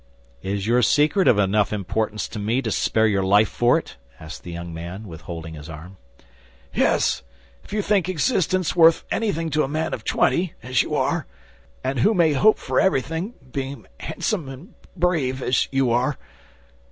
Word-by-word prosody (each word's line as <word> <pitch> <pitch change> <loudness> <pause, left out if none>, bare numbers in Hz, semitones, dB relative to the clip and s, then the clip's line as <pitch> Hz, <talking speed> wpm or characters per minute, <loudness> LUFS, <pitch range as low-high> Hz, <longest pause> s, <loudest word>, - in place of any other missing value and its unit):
"Is 100 0 -3
your 120 +2 +3
secret 155 +9 +3
of 110 - +5
enough 105 +1 +2
importance 105 +1 -2
to 110 - -6
me 115 +6 0
to 110 - -2
spare 110 +2 +2
your 100 -3 +2
life 100 +2 +4
for 120 +1 +3
it?" - - -7 0.2
asked 80 +2 -9
the 90 - -9
young 85 0 -6
man, 85 +6 -7
withholding 80 -1 -8
his 75 +1 -10
arm. 85 +5 -10 0.8
"Yes; - - +2 0.4
if - - -16
you 210 0 -1
think 195 -4 +1
existence 185 - +1
worth 165 -1 +6
anything 165 -8 -1
to 155 +2 +2
a - - -1
man 155 +3 -2
of - - -5
twenty, 175 -1 +1
as 125 -1 +2
you - - -3
are, - - 0 0.6
and 130 0 -1
who 215 - +3
may 165 -4 +4
hope 215 +10 +4
for - - -1
everything, 165 - 0 0.2
being 135 +1 -5
handsome 170 -11 -3
and 135 +6 -11 0.2
brave, 150 -7 0
as 125 - +1
you 135 -3 +2
are." 125 +4 +1
130 Hz, 175 wpm, -23 LUFS, 100-165 Hz, 0.8 s, worth